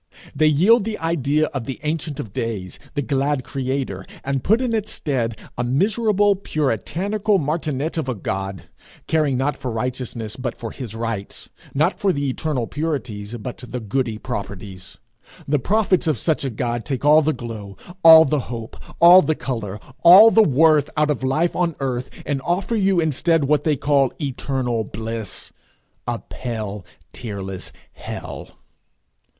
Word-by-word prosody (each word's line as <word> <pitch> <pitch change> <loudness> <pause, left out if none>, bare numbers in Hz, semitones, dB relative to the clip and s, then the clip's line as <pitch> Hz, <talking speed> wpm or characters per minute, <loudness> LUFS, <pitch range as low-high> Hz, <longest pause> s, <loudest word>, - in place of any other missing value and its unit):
They 155 +2 +4
yield 195 +10 +5
the 220 0 -3
idea 155 -2 +1
of 135 -5 -3
the 130 - -5
Ancient 155 -1 -3
of 100 - -6
Days, 100 -6 -4 0.2
'the 145 - 0
glad 140 0 0
creator,' 130 -7 -3 0.2
and 135 -1 -2
put 220 +3 +3
in 250 -3 -1
its 215 -1 -1
stead 120 -6 -2 0.2
a - - +1
miserable, 205 - +2
puritanical 195 - -1
martinet 155 -1 -2
of 140 -4 -3
a 125 - -1
God, 95 -2 -4 0.4
caring 150 -5 +1
not 140 +3 0
for 130 -2 -5
righteousness, 120 -1 -4
but 125 -2 -4
for 115 -2 -6
his 120 -5 -7
rights; 115 -3 -4 0.3
not 155 +7 +1
for 200 - +2
the 145 -4 -1
eternal 130 -2 -2
purities, 120 -8 -4
but 120 +2 -6
the 125 0 -6
goody 115 +1 -2
proprieties. 100 -5 -7 0.5
The 150 0 +2
prophets 190 - +1
of 155 - +2
such 160 -4 0
a 135 - -1
God 120 0 -2
take 140 -1 -3
all 150 +1 +7
the 155 +1 +1
glow, 110 -7 -7 0.3
all 160 -1 +10
the 145 +1 +1
hope, 115 -2 -6 0.2
all 175 +2 +9
the 155 -3 0
colour, 110 -8 -4 0.2
all 195 +6 +10
the 225 - +6
worth, 155 -3 +4
out 150 0 +3
of 140 - -2
life 155 +6 +1
on 170 -3 0
earth, 125 -2 -2 0.2
and 140 -1 -1
offer 180 - -1
you 195 -4 +2
instead 160 +1 +2
what 145 +2 +1
they 155 -2 +3
call 140 -1 +2
eternal 130 -4 -2
bliss 110 -1 -6 0.5
a - - -1
pale, 110 -5 -6 0.3
tearless 95 -5 -6 0.2
hell. - - -7
135 Hz, 160 wpm, -21 LUFS, 115-160 Hz, 0.5 s, all